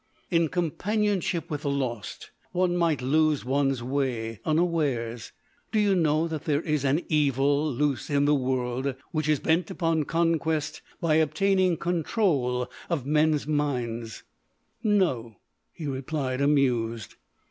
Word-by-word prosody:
"In 165 -1 +3
companionship 185 +1 -1
with 145 -1 -3
the 145 - -2
lost, 130 -6 -4 0.2
one 180 0 +1
might 165 -6 +1
lose 155 +1 +2
one's 135 -1 +1
way—unawares.... 130 - -1 0.4
Do 220 - +2
you 205 -2 +3
know 160 -2 +2
that 160 -2 -5
there 150 0 +1
is 150 -4 0
an 145 +5 +1
Evil 145 0 +2
loose 140 -1 -1
in 145 -1 +2
the 145 - +4
world 130 0 -1 0.2
which 155 -2 -1
is 150 -2 +3
bent 165 +4 +1
upon 165 -5 0
conquest 160 -2 0 0.2
by 155 -2 +2
obtaining 180 +3 +2
control 155 - 0 0.2
of 160 -7 -1
men's 150 0 +2
minds?" 125 -7 -2 0.6
"No," 175 - +1 0.4
he 160 - -8
replied, 135 -1 -2
amused. 120 -7 +1
150 Hz, 125 wpm, -26 LUFS, 130-165 Hz, 0.6 s, the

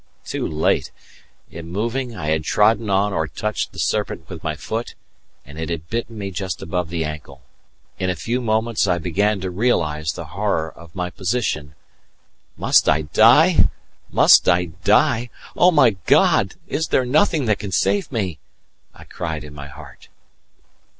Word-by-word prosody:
too - - -3
late! 80 0 0 0.6
In 85 0 -9
moving 115 +6 -3
I 75 -5 -4
had 80 0 0
trodden 105 +4 +2
on 100 +1 +1
or 80 -2 -1
touched 105 +6 -3
the - - -15
serpent - - -2
with - - -9
my - - -2
foot, 115 +2 -5 0.5
and 75 +2 -11
it 80 - -4
had 85 0 -5
bitten 115 -1 -3
me 100 -2 -5
just 95 0 -4
above 90 0 -3
the 85 -1 -2
ankle. 70 -4 -8 0.6
In 95 -1 -1
a 90 - -1
few 120 +7 -2
moments 110 -2 0
I 90 -2 +2
began 100 +5 0
to 95 -1 -3
realize 80 -8 0
the 85 - -7
horror 100 -6 -1
of 85 -1 -16
my 90 -1 -3
position. 90 - -2 0.8
"Must - - +3
I 75 +1 +2
die! 120 - +5 0.4
must - - +6
I 90 -1 +2
die! 120 +2 +3 0.3
Oh, 180 - +5
my 145 -9 +5 0.2
God, - - +3
is 160 - -2
there 130 - +1
nothing 155 +2 +2
that 105 -2 +1
can 100 - -6
save 100 +2 +1
me?" 95 - -3 0.6
I - - -13
cried 80 -3 -5
in 75 -1 -11
my 70 -1 -9
heart. 70 - -14
95 Hz, 165 wpm, -21 LUFS, 80-115 Hz, 0.8 s, must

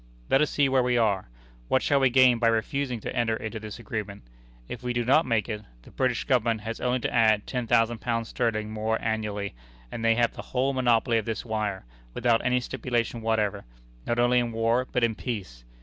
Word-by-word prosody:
"Let 135 - +5
us 150 - +2
see 145 -1 +2
where 130 -1 +3
we 125 0 +1
are. 100 - +1 0.4
What 130 - +2
shall 140 - +3
we 135 -1 +4
gain 125 -1 +5
by 115 - +3
refusing 120 +3 0
to - - -5
enter 115 -2 +1
into 110 0 -5
this 110 -1 -8
agreement? 105 - -6 0.4
If - - -7
we 125 0 -2
do 120 -1 -1
not 140 +5 +4
make 115 -3 +1
it, 105 -2 -4 0.2
the - - -16
British 130 -2 0
Government 115 -3 +1
has 115 +2 -6
only 125 0 0
to - - -2
add 110 -3 +3
ten 125 -3 -3
thousand 115 0 +2
pounds 115 -2 -2
sterling 110 -3 -1
more 110 +1 -1
annually, 105 -2 -2 0.4
and 115 - -5
they 115 0 +4
have 120 0 +2
the - - -7 0.2
whole 135 +2 +2
monopoly 120 -2 +2
of 110 - -6
this 115 +1 -4
wire, 105 - -3 0.3
without 120 -2 +2
any 125 0 +2
stipulation 120 -2 -2
whatever 105 -3 0 0.4
not 120 - 0
only 120 +1 +4
in 120 -1 -1
war 115 +3 +1
but 125 - 0
in 115 -1 +3
peace. 95 - -6
115 Hz, 210 wpm, -26 LUFS, 110-125 Hz, 0.4 s, Let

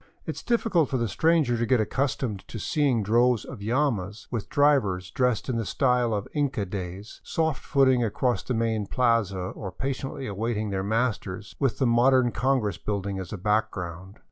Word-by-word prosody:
It - - -4
is - - -7
difficult 225 - +1
for 130 - 0
the 120 -1 0
stranger 155 -5 +2
to 120 - +1
get 125 +1 +3
accustomed 120 -2 -1
to - - -7
seeing 130 -1 +1
droves 120 +2 +3
of 120 -6 -9
llamas, 110 -4 -1
with 115 -5 -3
drivers 105 -12 +2
dresised 125 -4 0
in 125 -3 -1
the 115 - -1
style 125 +1 +1
of 105 -2 -2
Inca 135 -8 0
days, 95 +2 -7
soft 160 -3 -1
footing 130 -3 +3
across 115 0 0
the 125 - -3
main 110 -2 0
plaza 115 -5 +1
or 95 +1 -5
patiently 135 - -4
awaiting 110 0 -2
their 95 -1 -1
masters, 105 -2 -2
with 135 -5 +1
the 135 - +1
modern 120 +1 +4
congress 120 -9 0
building 100 -2 -3
as 95 -2 -7
a 105 - -4
background. 95 -2 -2
115 Hz, 175 wpm, -26 LUFS, 100-130 Hz, -, modern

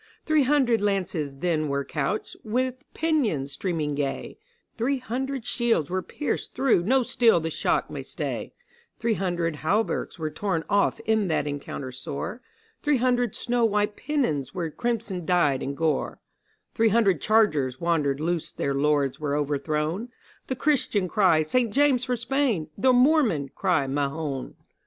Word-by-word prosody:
Three 310 -1 +3
hundred 260 -5 +3
lances 185 -8 -1
then 155 +1 0
were 140 0 -1
couched, 150 +8 -2
with 255 +4 -1
pennons 240 - 0
streaming 160 -3 -2
gay; 140 -1 -3 0.4
Three 260 +4 0
hundred 255 0 -4
shields 230 - +1
were 185 0 0
pierced 295 - -4
through 260 -8 +3
no 255 +8 +3
steel 230 -6 +4
the 160 0 -3
shock - - 0
might - - -6
stay; - - -4 0.5
Three 230 -1 +1
hundred 175 -5 -1
hauberks 195 +9 -1
were 155 -2 -3
torn 165 0 -1
off 200 -1 +2
in 220 -2 +1
that 160 -3 0
encounter 140 -2 -5
sore; 145 - -5 0.4
Three 295 -2 +2
hundred 245 -2 +1
snow 240 -1 0
white 210 -1 +1
pennons 220 - -1
were 170 -3 -2
crimson 225 -4 -2
dyed 155 -6 +2
in 140 +1 -3
gore; 160 0 -1 0.5
Three 225 0 +3
hundred 200 - +3
chargers 155 - +2
wandered 150 -5 +1
loose 170 +1 -2
their 140 - -2
lords 140 -1 +1
were 145 -2 -1
overthrown; 150 - -1 0.4
The 260 - -2
Christians 240 - +1
cry 180 -7 +4
'St. 235 +7 +1
James 270 -1 +3
for 250 -2 0
Spain!' 240 - 0
the 255 +6 +3
Moormen 250 - +3
cry 180 -8 +1
'Mahoun! 140 0 -3
190 Hz, 150 wpm, -26 LUFS, 150-240 Hz, 0.5 s, steel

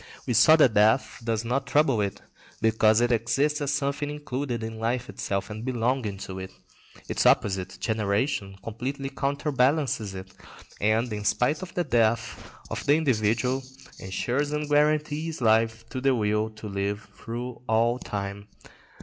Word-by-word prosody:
We 125 - 0
saw 155 +8 +7
that 135 -8 +5
death 110 +5 +3
does 115 -1 -1
not 135 +4 -1
trouble 140 -7 +3
it, 100 -1 -3 0.4
because 110 0 +4
it 120 0 +2
exists 135 +7 +1
as 145 -1 0
something 145 0 -1
included 140 -5 -4
in 110 0 -5
life 120 +2 -1
itself 100 +2 -3
and 110 +1 -6
belonging 120 -4 -1
to 95 0 -6
it. 95 0 -6 0.6
Its - - +1
opposite, 95 -2 +2
generation, 105 -1 -1
completely 135 +5 -4
counterbalances 140 -6 0
it; 95 0 -9 0.5
and, 110 +2 +1
in 105 0 -4
spite 125 +8 +1
of 185 -2 -8
the 175 - +1
death 115 -3 0 0.2
of - - -3
the 145 - +6
individual, 125 -2 +1 0.4
ensures 125 +9 -2
and 150 0 -2
guarantees 150 +2 +1
life 115 -1 +2
to 130 - -5
the 135 -1 +3
will 105 -1 0
to 110 0 -9
live 100 +1 -3
through 120 +1 -6
all 115 +2 +2
time. 100 -1 -5
120 Hz, 150 wpm, -26 LUFS, 110-140 Hz, 0.6 s, saw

